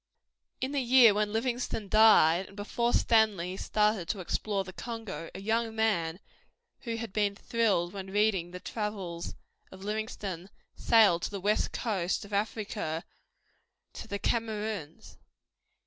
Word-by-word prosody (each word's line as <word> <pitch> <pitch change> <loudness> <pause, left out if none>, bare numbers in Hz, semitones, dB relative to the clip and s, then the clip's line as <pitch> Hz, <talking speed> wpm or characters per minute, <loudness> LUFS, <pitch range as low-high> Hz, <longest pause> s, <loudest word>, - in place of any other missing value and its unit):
In 260 +1 -1
the 285 -1 0
year 245 -3 +7
when 210 0 0
Livingstone 235 -2 -2
died, 195 -5 +5
and 195 - -15
before 235 +3 -1
Stanley 210 -8 +2
started 210 -2 +1
to 200 - -2
explore 195 +2 -2
the 185 -1 -10
Congo, 225 -7 -6
a - - -6
young 225 +2 -1
man, 185 -7 0 0.6
who 230 -3 -4
had 230 -3 -6
been 205 -2 +1
thrilled 200 -6 0
by 200 - -4
reading 195 -2 0
the 180 +1 -8
travels 195 -6 -5 0.4
of 190 0 -11
Livingstone, 205 -4 -4 0.3
sailed 210 -7 +4
to - - -2
the 200 - -5
West 205 +3 +1
Coast 195 -5 -1
of 205 - -12
Africa 200 -5 -2 0.9
to - - -8
the 200 - -3
Kameruns. 215 -7 -3
210 Hz, 140 wpm, -29 LUFS, 190-225 Hz, 0.9 s, year